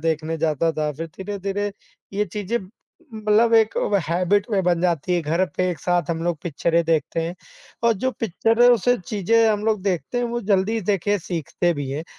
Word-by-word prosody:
देखने 160 0 -1
जाता 160 0 +1
था 155 -1 -1
फिर 165 +4 -6
धीरे-धीरे 200 +1 -3 0.4
ये 205 +1 0
चीज़ें 210 +2 -2 0.6
मतलब 215 +2 +3
एक 220 -1 +4
व 205 - +1
हैबिट 185 +4 +2
में 195 -3 +1
बन 175 -1 +2
जाती 175 -1 0
है 175 - +1
घर 165 +4 +1
पे 185 0 +1
एक 175 - -5
साथ 175 -2 0
हम 165 -1 -2
लोग 175 -2 0
पिक्चरें 170 +1 +1
देखते 160 0 0
हैं 170 +2 -4 0.5
और 235 - +5
जो 260 - +3
पिक्चर 225 +3 +1
है 245 - +8
उसे 245 +2 +2
चीज़ें 225 +3 +2
हम 210 -1 0
लोग 220 -3 +1
देखते 195 +5 -1
हैं 245 - 0
वो 240 0 -2
जल्दी 205 +4 +1
देखे 205 +1 +1
सीखते 175 0 -1
भी 140 -2 -4
हैं। 150 +4 -4
185 Hz, 195 wpm, -22 LUFS, 165-215 Hz, 0.6 s, है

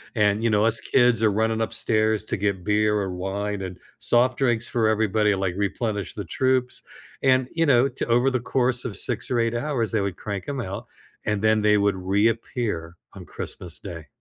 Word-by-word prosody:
and, 105 0 +2
you 115 - +3
know, 105 0 +3
us 115 0 +2
kids 120 -3 +3
are 110 -2 +4
running 110 +2 0
upstairs 110 -1 0
to - - -2
get 100 -2 -1
beer 105 +1 +2
or 95 -3 -1
wine, 100 +2 -3
and 95 -1 -6 0.2
soft 125 +1 +2
drinks 120 -3 +1
for 115 -2 +1
everybody, 105 -1 +2
like, 95 -2 -2
replenish 100 -1 -2
the 105 - -5
troops, 130 +7 0 0.4
and, 130 -1 +3
you 165 0 +2
know, 135 -2 +4
to 130 - -4
over 120 +3 +3
the 130 - 0
course 125 0 0
of 115 -5 -4
6 120 -4 -1
or 125 - +1
8 115 0 +1
hours, 120 -3 -1
they 110 -3 +1
would 100 -2 -3
crank 100 -3 -5
'em 140 -2 -3
out, 95 -3 -6 0.4
and 105 -2 0
then 110 0 +3
they 105 0 +4
would 100 -1 +2
reappear 100 -2 -1 0.2
on - - -10
Christmas 85 -3 -7
Day. 85 -5 -8
110 Hz, 200 wpm, -24 LUFS, 100-120 Hz, 0.4 s, are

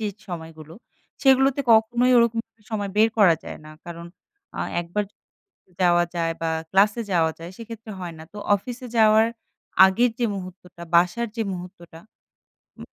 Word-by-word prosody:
যে 215 - -2 0.2
সময়গুলো, 160 -2 -9 0.5
সেগুলোতে 270 0 +4
কখনোই 240 +3 +3
ওরকম 235 -1 +2 0.3
সময় 205 -3 -3
বের 220 +1 +5
করা 185 -6 +6
যায় - - -8
না। 155 - -11
কারণ, 170 0 -8 0.5
আ - - -6 0.2
একবার 175 +5 -3 0.8
যাওয়া 175 -1 +4
যায় 165 -1 0
বা 165 - 0 0.2
ক্লাসে 205 +4 +3
যাওয়া 165 -3 +2
যায় 165 +1 -8
সেক্ষেত্রে 225 -1 -9
হয় 175 -2 -6
না। 160 - -10
তো 210 - -10 0.2
অফিসে 245 +4 -8
যাওয়ার 220 0 +5 0.6
আগের 230 +6 +2
যে 240 - +2
মুহূর্তটা 180 -2 -10
বাসার 180 +8 +2
যে 230 - -2
মুহূর্তটা, 175 -2 -10 0.8
উম - - -9
195 Hz, 150 wpm, -23 LUFS, 170-230 Hz, 0.8 s, করা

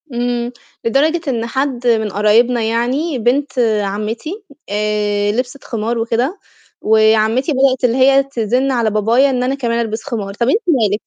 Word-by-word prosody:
إمم، 240 0 -2 0.3
لدرجة 300 +8 +2
إن 235 -4 -1
حد 255 0 -2
من 220 -2 +2
قرايبنا 225 +4 +2
يعني، 250 +7 -1
بنت 260 +4 0 0.2
عمّتي 225 - -4 0.3
آآ، 205 0 0
لبسِت 250 +4 -4
خمار 230 +1 -3
وكده، 240 - -1 0.4
وعمّتي 220 +5 +3
بدأت 265 -1 +2
اللي 245 0 +2
هي 270 +1 +5
تزِنّ 255 0 -1
على 235 -4 +1
بابايا 230 +6 +3
إن 250 -2 -1
أنا 260 +2 0
كمان 235 -4 -1
ألبِس 225 -1 -4
خمار، 215 -7 -4
طَب 235 +4 0
أنتِ 420 - +3
مالِك؟ 220 - +1
240 Hz, 150 wpm, -17 LUFS, 220-265 Hz, 0.4 s, هي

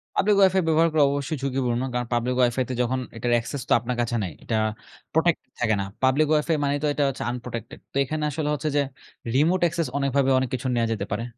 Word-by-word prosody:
Public 205 +1 +3
wifi 190 -1 +5
ব্যবহার 165 +1 +4
করা 155 -2 +5
অবশ্যই 145 +2 -2
ঝুঁকিপূর্ণ। 125 -3 0
কারণ 125 -1 -1
পাবলিক 120 +1 0
ওয়াইফাইতে 125 +1 +1
যখন 125 +2 0 0.2
এটার 120 +2 -1
অ্যাকসেস 120 +4 -2
তো - - +5
আপনার 125 +2 -3
কাছে 120 0 -1
নাই। 90 - -4
এটা 115 - -2 0.6
প্রটেক্ট 165 +1 +2 0.2
থাকে 110 -3 +2
না। - - -2 0.2
পাবলিক 135 +4 +4
ওয়াইফাই 155 +1 +2
মানেই 145 0 +1
তো 150 - +2
এটা 145 - 0
হচ্ছে 135 - -5
unprotected। 120 -1 -7
তো - - -25
এখানে 155 +3 -3
আসলে 150 +1 -2
হচ্ছে 150 +1 -2
যে, - - +4 0.5
রিমোট 165 +7 +3
access 165 -2 -2
অনেকভাবে 140 -1 +1
অনেক 130 -1 -1
কিছুর 130 0 -1
নেওয়া 115 -1 +1
যেতে 105 -3 -3
পারে। 105 +3 -1
135 Hz, 210 wpm, -24 LUFS, 120-155 Hz, 0.6 s, ওয়াইফাই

